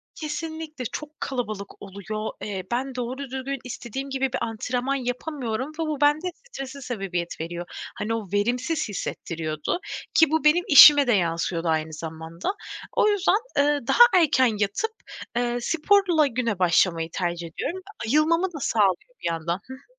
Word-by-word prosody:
Kesinlikle 310 -2 -5
çok 300 +6 -7
kalabalık 215 -6 -4
oluyor. 200 +2 -5
Eee, 195 -3 -4
ben 260 +2 -2
doğru 250 +1 -3
düzgün 270 0 -4
istediğim 255 +2 -6
gibi 270 0 0
bir - - -1
antrenman 250 +4 -2
yapamıyorum 255 0 -3
ve 325 - +1
bu 305 -3 -3
bende 305 +5 +3 0.2
strese 275 - -7
sebebiyet 190 -10 -4
veriyor. 175 +1 -5 0.3
Hani, 220 +2 -2
o 220 -3 -3
verimsiz 245 +7 0
hissettiriyordu 160 - -3 0.3
ki 320 -2 +5
bu 320 -2 +1
benim 310 +4 +5
işime 290 -3 +10
de 240 - +4
yansıyordu 170 -2 0
aynı 160 0 0
zamanda. 160 - -6 0.5
O 425 - +5
yüzden, 405 0 +3 0.2
eee, 290 +1 +3
daha 480 - +7 0.2
erken 260 -7 +3
yatıp, 205 - 0 0.4
eee, 240 0 0
sporla 335 0 +3
güne 230 -6 -2
başlamayı 170 -2 +3
tercih 175 -2 -2
ediyorum. 345 - -4 0.3
Ayılmamı 315 +7 +3
da 300 - -6
sağlıyor 210 - +1
bir - - +1
yandan. 170 +3 -2
Hı 260 - -8
hı. 260 - -14
250 Hz, 150 wpm, -25 LUFS, 195-295 Hz, 0.5 s, işime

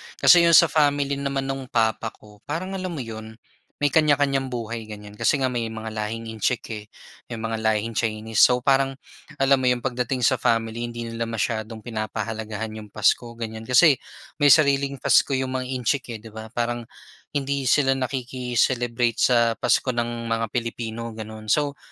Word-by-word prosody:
Kasi 170 -1 +6
'yong 170 - +6
sa 165 -3 +7
family 145 -2 +2
naman 140 -1 -2
no'ng 135 -1 -4
papa 115 -3 0
ko, 105 -1 -18
parang 175 +6 -3
alam 185 -3 -4
mo 135 - -4
'yon, 110 -1 -8 0.5
may 145 - +3
kanya-kanyang 145 -3 +3
buhay 115 -2 -5
ganyan. 105 -1 -9
Kasi 145 - +3
nga 130 - +1
may 120 -2 -2
mga 110 0 -6
lahing 110 +1 -4
Intsik, 110 +3 -1
eh, 105 -1 -6 0.4
may 120 - -5
mga 110 0 -3
lahing 110 +1 0
Chinese. 110 -1 -2
So 125 0 +5
parang 135 0 +2 0.4
alam 135 0 +3
mo 130 - 0
'yong 125 -1 +1
pagdating 125 +1 -2
sa - - +3
family 115 +1 0
hindi 120 0 -6
nila 115 0 -4
masyadong 110 0 -3
pinapahalagahan 110 -1 -4
'yong 105 -1 -13
Pasko 120 -1 +1
ganyan. 110 -1 -6
Kasi 130 +3 +5 0.4
may 145 - +5
sariling 140 -2 +4
Pasko 135 - +4
'yong 130 0 -2
mga 130 -1 -3
Intsik 125 -1 -2
eh, - - -5
'di 115 - -11
ba? 110 +1 -8
Parang 120 0 -3 0.5
hindi 140 -1 -2
sila 135 0 +4
nakiki-celebrate 125 -2 -1
sa 120 -2 +4
Pasko 125 - +1
ng 120 -1 -3
mga 115 0 -1
Pilipino, 115 -1 -4
ganun. 110 0 -8
So 145 +4 +1
120 Hz, 170 wpm, -24 LUFS, 110-135 Hz, 0.5 s, sa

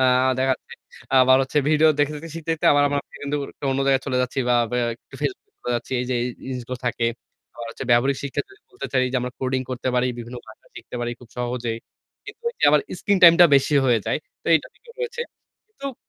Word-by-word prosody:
আ - - +4 0.4
দেখা 130 0 +3
যাচ্ছে - - -15 0.5
আবার 130 0 +6
হচ্ছে 140 +3 0
ভিডিও 155 +1 +5
দেখে-দেখে 150 +2 -1
শিখতে, 165 0 -5
শিখতে 155 - -7
আবার 145 0 +4
আমার 145 0 0
সেখান 145 - -7
থেকে 145 - +1 0.2
আবার 135 - 0
অন্য 135 - -1
জায়গায় 135 -1 +3
চলে 130 - 0
যাচ্ছি 125 +2 -3
বা 125 - +4 0.2
ব্যা 125 -1 0
একটু 120 - -21
Facebook 410 +2 -4
চলে 125 - -5
যাচ্ছি। 120 - -7
এই - - -2
যে 125 - +1
এই 120 - -1 0.2
জিনিসগুলো 125 -1 -5
থাকে। 115 -1 0 0.5
আবার 120 - -7
হচ্ছে 130 - -7
ব্যবহারিক 130 +3 +4
শিক্ষা 140 -1 -2
যদি 395 +2 -19
বলতে 385 - -6
চাই 130 -1 +3
যে - - +1
আমরা 125 0 -4
কোডিং 130 0 0
করতে 130 +1 -3
পারি, 125 0 +2
বিভিন্ন 120 +1 -7
ভাষা 110 - -15
শিখতে - - -8
পারি 120 0 -2
খুব 120 - -15
সহজেই। 120 -2 -2 0.5
কিন্তু 420 +3 -11 0.2
এ - - -8
আবার - - +5 0.2
স্ক্রিন 200 -2 +2
টাইমটা 170 0 +9
বেশি 140 +2 +3
হয়ে 120 -2 +4
যায়। - - 0 0.2
তো - - -19
এইটা 160 - +1
কিন্তু 470 - -18
রয়েছে। 475 0 -4 0.6
তোপ 275 -1 -4
130 Hz, 225 wpm, -23 LUFS, 125-155 Hz, 0.6 s, টাইমটা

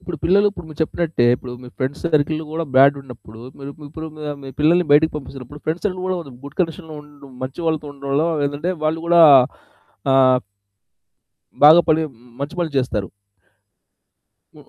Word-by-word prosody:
ఇప్పుడు 175 -3 -7
పిల్లలు 200 +4 +4
ఇప్పుడు 185 - -11
మీరు 155 - -12
చెప్పినట్టే 160 -4 -1
ఇప్పుడు 125 -1 -9
మీ 125 - -10
ఫ్రెండ్స్ 135 +2 -4
సర్కిల్‌లో 155 0 0
గూడా 165 +1 -3
బ్యాడ్ 140 +2 +6
ఉన్నప్పుడు 120 -4 -13 0.2
మీరిప్పుడు 150 +3 -9
మా 155 - -8 0.2
మీ 135 - -9
పిల్లల్ని 170 +3 +3
బయటకి 155 +2 +4
పంపిస్తున్నప్పుడు 135 0 -10
ఫ్రెండ్స్ 160 +3 -3
సర్కిల్ 185 -2 -4
గూడా 185 -1 -1 0.3
గుడ్ 140 0 -11
కండిషన్‌‌‌లో 165 -2 -3
ఉండ్ 145 -1 -18 0.2
మంచి 130 +5 -7
వాళ్ళతో 155 -2 -1
ఉండాలా 140 +2 -1 0.2
ఏందంటే 145 +6 -3
వాళ్ళు 155 +1 0
గూడా 170 0 +5 0.9
ఆహ్ 130 -1 +5 1.3
బాగా 155 +3 +9
పలి 160 0 +3 0.4
మంచి 145 +6 -5
పనులు 170 -3 -2
చేస్తారు. 105 -7 -2 1.5
హ్మ్. - - -18
150 Hz, 150 wpm, -20 LUFS, 140-165 Hz, 1.5 s, బాగా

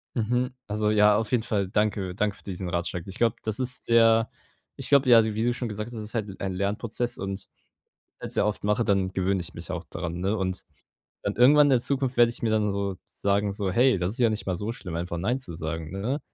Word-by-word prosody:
Mhm, 125 +2 0 0.2
also 105 0 0
ja, 105 -1 +5
auf 110 0 -2
jeden 120 -3 +2
Fall 100 -4 -1
danke 100 -2 -1
danke 105 0 0
für - - -20
diesen 95 -2 -5
Ratschlag. 85 0 -2
Ich 95 - -6
glaube, 115 -2 +2
das 110 +1 -2
ist 125 0 0
sehr 115 -1 +4 0.5
ich - - -1
glaube, 140 -2 +5
ja, 115 -2 +8
wie 110 0 -1
du 120 +1 +2
schon 120 -2 -3
gesagt 105 +1 -4
hast, 120 - -9
das 110 - -5
ist 105 - -7
halt 105 -5 -4
ein 95 -1 -2
Lernprozess 105 +5 -2
und 95 0 -5 0.7
wenn's - - -5
sehr - - +2
oft 105 0 -2
mache, 105 +3 +1
dann 95 -3 +1
gewöhne 95 0 0
ich 85 - -8
mich - - -7
auch - - -4
daran, 85 0 -4
ne? 100 +4 0
Und 95 -1 -3 0.6
dann 100 - -2
irgendwann 145 +5 +7
in - - +3
der 130 -3 +4
Zukunft 135 0 -1
werde 120 -1 +6
ich 120 - -8
mir 115 - +1
dann 105 -1 +2
so 100 -1 -2
sagen, 100 0 0
so: 100 -1 -2
„Hey, 120 +3 +4
das 90 +1 -1
ist 120 - -5
ja 120 -3 +4
nicht 110 0 -3
mal 95 -2 -1
so 105 +5 -3
schlimm, 90 -8 -7
einfach 85 0 -3
nein 120 +9 0
zu 130 -10 -8
sagen“, 80 0 -5
ne? 115 - -2
105 Hz, 245 wpm, -26 LUFS, 95-115 Hz, 0.7 s, ja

